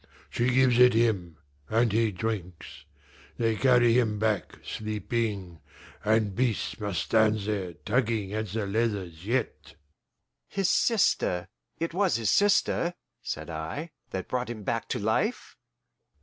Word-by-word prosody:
She 120 +1 +1
gives 125 -1 +4
it 125 -2 +7
him, 100 -8 +1 0.3
and 115 0 +2
he 110 +1 +2
drinks; 90 -3 -5 0.5
they 115 -1 +1
carry 120 -1 +4
him 110 -3 0
back, 110 -1 -1
sleeping, 105 -4 -3 0.4
and 110 -1 +2
Beast 120 0 -1
must 100 -3 -1
stand 110 -1 +3
there 100 -4 -3
tugging 110 -2 -1
at 110 0 -2
the 105 +2 -3
leathers 100 -5 -2
yet." 125 0 -2 0.7
"His 195 -2 +1
sister 140 - +2 0.3
it 165 0 -3
was 190 0 +2
his 115 -3 +1
sister," 190 -3 +2 0.3
said 85 -9 -5
I, 80 - -5 0.2
"that 95 -1 -4
brought 125 -1 -2
him 110 -3 -6
back 115 +3 -2
to - - -2
life?" 110 - -1
110 Hz, 135 wpm, -28 LUFS, 100-120 Hz, 0.7 s, it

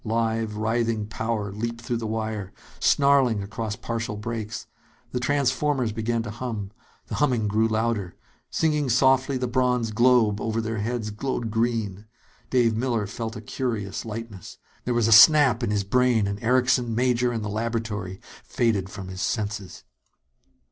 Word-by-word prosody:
Live, 110 -1 -1
writhing 110 0 0
power 110 -1 -3
leaped 115 +3 -4
through 120 0 -2
the 115 -1 -4
wire, 110 -3 -3 0.3
snarling 135 -7 +3
across 110 +1 -4
partial 110 -1 -4
breaks. 110 0 -5 0.5
The 125 - -1
transformers 135 -1 +1
began 115 +1 -1
to 115 - -6
hum. 110 -4 -5 0.3
The - - -8
humming 125 -7 +2
grew 110 +2 +2
louder. 110 -4 -1 0.3
Singing 150 -4 +1
softly, 130 +2 +3
the 125 - -1
bronze 125 -2 +1
globe 115 -2 +3
over 110 0 -1
their 110 -1 -2
heads 110 0 -2
glowed 115 0 -3
green. 110 -3 -1 0.4
Dave 120 -3 +3
Miller 115 -2 0
felt 110 +2 -5
a 105 - -7
curious 110 -4 -3
lightness. 110 -4 -8 0.3
There 125 - 0
was 120 -2 +2
a - - +2
snap 135 +2 +7
in 120 - -1
his 105 -1 0
brain, 120 0 +2
and 100 +1 -4
Erickson, 125 -1 +2
Major 125 0 +2
and 115 -3 -3
the - - -2
laboratory 110 -3 -3 0.2
faded 105 -6 0
from 100 -2 -8
his 95 0 -6
senses. 105 -4 -3
115 Hz, 155 wpm, -25 LUFS, 105-125 Hz, 0.5 s, snap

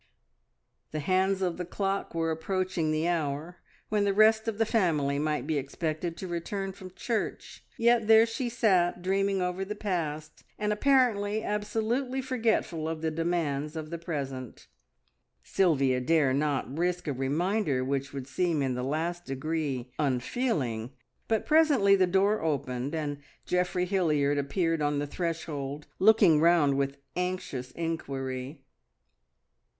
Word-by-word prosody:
The 155 - -4
hands 190 +4 +1
of 175 -2 -1
the 180 - -3
clock 195 +1 -2
were 165 0 0
approaching 180 0 -1
the 155 +2 0
hour 160 0 -2 0.3
when 210 -1 +2
the 200 -1 +1
rest 220 +1 +5
of 220 -2 -2
the 225 - +2
family 155 - +1
might 150 0 -1
be 155 -2 0
expected 155 +4 -3
to 190 - -6
return 190 +3 -3
from 185 -1 -12
church, 230 -3 -3
yet 235 -2 +3
there 220 0 +7
she 235 +2 -3
sat 185 -7 +2
dreaming 195 0 +1
over 180 +1 -2
the 210 +2 -5
past, 155 -7 -3
and 210 0 0
apparently 220 -4 +2
absolutely 225 +5 -1
forgetful 225 -11 0
of 160 -1 -4
the 160 - 0
demands 155 -3 -1
of 155 0 -6
the 170 - -4
present. 135 - -5 0.8
Sylvia 135 -8 +2
dare 145 -1 +3
not 140 -1 -1
risk 175 +1 -1
a 145 - 0
reminder 145 - 0
which 140 0 -2
would 135 -2 -6
seem 155 +1 0
in 130 -1 0
the 125 - -3
last 165 +6 -2
degree 135 -2 -3
unfeeling, 130 - -1 0.3
but 220 -2 0
presently 290 -11 +5
the 190 -2 +3
door 195 +4 +2
opened, 140 -2 -2
and 145 -2 -3 0.3
Geoffrey 180 0 0
Hilliard 150 -6 +1
appeared 165 +3 0
on 145 0 +1
the 145 - -1
threshold, 150 -3 -4
looking 195 -6 +6
round 165 -4 +4
with 140 0 -1 0.2
anxious 180 -8 -3
inquiry. 135 -4 -4
170 Hz, 145 wpm, -28 LUFS, 145-195 Hz, 0.8 s, there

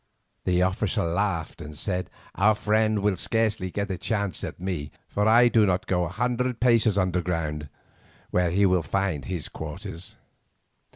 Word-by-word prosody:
The 90 0 +3
officer 95 +2 0
laughed 85 -1 -1
and 75 0 -8
said: 90 +1 -2 0.2
"Our 105 +4 +4
friend 110 -1 +1
will 100 -3 +2
scarcely 110 -3 0
get 100 +2 -3
a 90 - -4
chance 100 -4 -2
at - - -5
me, 90 -5 -3 0.2
for 105 +1 0
I 120 +2 +7
do 115 -2 +4
not 95 -2 +1
go 90 -2 +1
a - - -4
hundred 125 +5 -1
paces 115 -4 +4
underground, 85 -5 -1 0.6
where 90 -1 +2
he 100 +4 +3
will 90 -2 +3
find 85 -4 -1
his 85 -1 -3
quarters. 85 +3 -7
95 Hz, 160 wpm, -26 LUFS, 90-105 Hz, 0.6 s, I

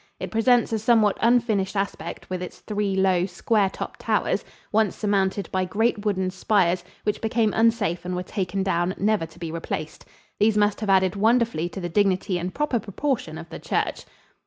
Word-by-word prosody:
It - - -5
presents 235 +1 +3
a 220 - +1
somewhat 220 -2 +4
unfinished 225 -5 +2
aspect 200 0 -4
with 185 -1 -4
its 180 - -8
three 205 -2 -1
low, 190 -1 +2
square 200 +2 +1
topped - - -7
towers, - - 0 0.3
once 215 -2 +2
surmounted 200 -1 0
by 185 0 +1
great 215 +3 0
wooden 190 -3 0
spires, 185 -2 +1 0.2
which 210 - -1
became 220 -1 +1
unsafe 225 -6 +2
and 180 0 -3
were 180 - -2
taken 190 0 -2
down, 180 -1 0
never 205 -4 +1
to 160 - -19
be 170 -2 -5
replaced. 160 -1 -5 0.3
These 210 0 +3
must 205 0 +2
have 210 - -2
added 190 -1 +3
wonderfully 225 -5 +2
to 195 - -7
the 175 - -3
dignity 185 0 +1
and 180 +2 -3
proper 285 0 0
proportion 205 - -3
of 165 +1 -9
the - - -7
church. - - -2
200 Hz, 180 wpm, -24 LUFS, 180-220 Hz, 0.3 s, somewhat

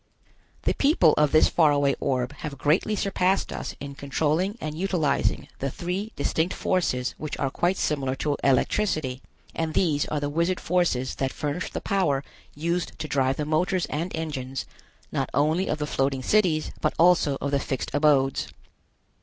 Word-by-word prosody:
The - - +2
people 275 - +4
of 150 -1 +3
this 155 - +6
far 160 -3 +4
away 140 -1 +2
orb 130 -1 -1
have 150 -5 -6
greatly 160 +10 +2
surpassed 195 -1 0
us - - -5
in 140 0 -6
controlling 155 +8 -1
and 155 -4 -4
utilizing 165 -5 0
the 135 - -1
three 180 +9 -4
distinct 160 +5 0
forces 130 -9 0
which 155 -1 -4
are 135 -2 -1
quite 175 +6 +1
similar 135 -3 0
to 145 +1 -1
electricity, 140 -1 +1 0.3
and 160 -1 -2
these 155 -6 +2
are 150 - -1
the 145 - -2
wizard 170 +5 0
forces 165 -8 0
that 135 -1 -1
furnish 150 +4 -3
the - - -5
power 170 -9 +1 0.3
used 170 +3 -2
to 155 - -4
drive 135 -2 +1
the 150 - -1
motors 175 +3 +1
and 165 +5 -2
engines, 135 -5 -4 0.5
not - - -1
only 155 +6 +2
of 155 - 0
the 150 - -2
floating 135 -2 -1
cities, 175 -6 +2
but - - 0
also 165 -5 +4
of 140 - -2
the 140 - +2
fixed 135 -1 -3
abodes. 145 -2 +3
150 Hz, 170 wpm, -25 LUFS, 140-175 Hz, 0.5 s, this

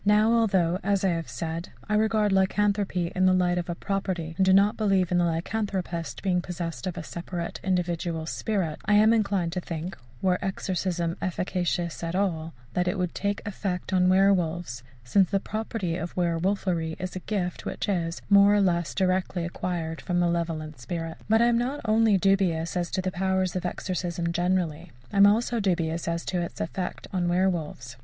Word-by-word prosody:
Now, 210 +3 +4
although, 190 -6 +2
as 200 -1 +1
I - - +4
have 165 -2 -2
said, 165 +1 -4 0.2
I 210 - -1
regard 215 -1 +2
lycanthropy 195 -2 +1
in 185 0 +3
the 185 - +5
light 180 -1 +2
of 175 - -5
a 170 - -2
property, 185 -4 -3
and 190 - +2
do 190 - +4
not 200 +2 +5
believe 195 -4 +2
in 175 - +3
the 175 - +3
lycanthropist 175 -1 -2
being 180 -2 +2
possessed 175 0 -5
of 180 - -4
a - - -4
separate 170 +1 -5
individual 175 -3 -1
spirit, 175 -2 -2
I 210 - +4
am 215 +2 +6
inclined 200 -6 +1
to 180 - -2
think, 170 +2 -5 0.2
were 185 -1 +1
exorcism 180 -3 -2
efficacious 175 -2 -2
at 165 +1 -2
all, 165 -6 -1 0.2
that 180 0 0
it 180 - 0
would 180 -2 -1
take 200 +1 -2
effect 190 -2 -3
on 185 -1 +4
werwolves, 175 -8 +2 0.2
since 185 +9 +3
the 195 - +1
property 210 -5 -3
of 175 -1 -5
werwolfery 170 -1 0
is 185 0 -5
a - - -2
gift 180 -2 -3
which - - -3
is, 170 -4 -1
more 200 0 +6
or 205 - +4
less, 170 -3 +1
directly 185 -2 0
acquired 170 -2 -3
from 175 -2 -1
the 175 - +3
malevolent 165 -4 -2
spirits. 165 +6 -5
But 225 +2 +5
I - - +5
am 235 -1 +3
not 260 +4 -2
only 215 -1 +4
dubious 180 -4 +1
as 175 -1 -1
to 185 - -2
the 185 - -1
powers 190 0 0
of 180 -1 -1
exorcism 175 -2 -3
generally, 175 -3 -1 0.2
I - - -1
am 200 0 +8
also 230 +3 +2
dubious 170 -5 0
as 170 0 -2
to 180 -2 -1
its 170 - -6
effect 180 +2 -4
on 180 -2 0
werwolves. 170 -9 -1
180 Hz, 190 wpm, -26 LUFS, 170-195 Hz, 0.2 s, am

